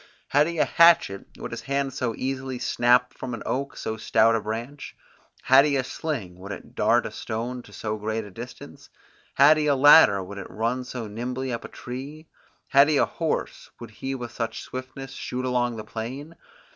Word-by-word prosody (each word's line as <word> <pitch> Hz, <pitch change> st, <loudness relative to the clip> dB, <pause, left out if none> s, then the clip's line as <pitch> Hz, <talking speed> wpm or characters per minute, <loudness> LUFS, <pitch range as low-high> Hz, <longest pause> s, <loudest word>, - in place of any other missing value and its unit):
Had 145 Hz, +2 st, +4 dB
he 170 Hz, 0 st, -4 dB
a -, -, +3 dB
hatchet, 165 Hz, -12 st, +4 dB
would -, -, -7 dB
his 115 Hz, 0 st, -5 dB
hand 140 Hz, +2 st, -2 dB
so 125 Hz, -4 st, -2 dB
easily 130 Hz, -1 st, -3 dB
snap 125 Hz, +1 st, +2 dB
off -, -, -26 dB
from 125 Hz, -2 st, -4 dB
an 115 Hz, -, -9 dB
oak 140 Hz, +2 st, -3 dB
so 110 Hz, -, -4 dB
stout 110 Hz, +1 st, +3 dB
a 115 Hz, -, 0 dB
branch? 115 Hz, +7 st, -6 dB, 0.5 s
Had 135 Hz, +1 st, +7 dB
he 145 Hz, -1 st, +1 dB
a 135 Hz, -, +1 dB
sling, 125 Hz, -, -5 dB
would 100 Hz, +2 st, -8 dB
it -, -, -9 dB
dart -, -, +2 dB
a -, -, -4 dB
stone 120 Hz, +3 st, -4 dB
to -, -, -17 dB
so 110 Hz, 0 st, -4 dB
great 110 Hz, +1 st, -3 dB
a 100 Hz, -, -11 dB
distance? 120 Hz, +6 st, -10 dB, 0.5 s
Had 145 Hz, +3 st, +7 dB
he 150 Hz, -1 st, 0 dB
a 145 Hz, -, +4 dB
ladder, 135 Hz, -8 st, +7 dB
would 100 Hz, +2 st, -8 dB
he -, -, -5 dB
run 115 Hz, +6 st, -2 dB
so 125 Hz, -2 st, -6 dB
nimbly 125 Hz, +4 st, -4 dB
up 115 Hz, -, -4 dB
a -, -, -5 dB
tree? 140 Hz, +6 st, -8 dB, 0.4 s
Had 140 Hz, +1 st, +6 dB
he 150 Hz, -, +3 dB
a -, -, +4 dB
horse, -, -, -3 dB
would 115 Hz, -2 st, -9 dB
he 135 Hz, +5 st, -5 dB
with 120 Hz, -3 st, -6 dB
such 115 Hz, -1 st, -4 dB
swiftness 130 Hz, +1 st, -8 dB
shoot 130 Hz, -1 st, -4 dB
along 120 Hz, -1 st, 0 dB
the 110 Hz, -, -6 dB
plain? 125 Hz, +9 st, -7 dB
125 Hz, 205 wpm, -25 LUFS, 115-135 Hz, 0.5 s, Had